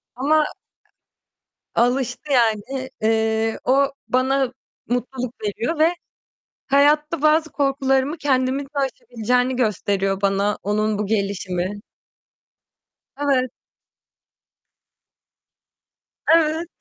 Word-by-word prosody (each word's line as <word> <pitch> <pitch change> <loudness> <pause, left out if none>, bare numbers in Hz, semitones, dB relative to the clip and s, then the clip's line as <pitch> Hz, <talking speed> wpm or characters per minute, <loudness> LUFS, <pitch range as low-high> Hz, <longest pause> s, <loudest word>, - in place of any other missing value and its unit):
Ama 300 +4 +3 1.3
alıştı 250 +3 0
yani. 245 +2 +1
Eee, 220 0 +1
o 275 +2 +3 0.2
bana 260 0 +1 0.4
mutluluk 250 0 -2
veriyor 235 +10 -2
ve 320 +1 +6 0.8
hayatta 295 +3 +3
bazı 310 +1 +3
korkularımı 275 +1 +1
kendimin 265 -1 +1
de 275 - -19
aşabileceğini 250 -1 0
gösteriyor 200 -4 0
bana 200 +1 +1
onun 215 +1 0
bu 210 - -1
gelişimi. 195 -2 -2 1.4
Evet. 270 -3 +1 2.8
Evet. 325 +1 +2
255 Hz, 80 wpm, -22 LUFS, 220-280 Hz, 2.8 s, ve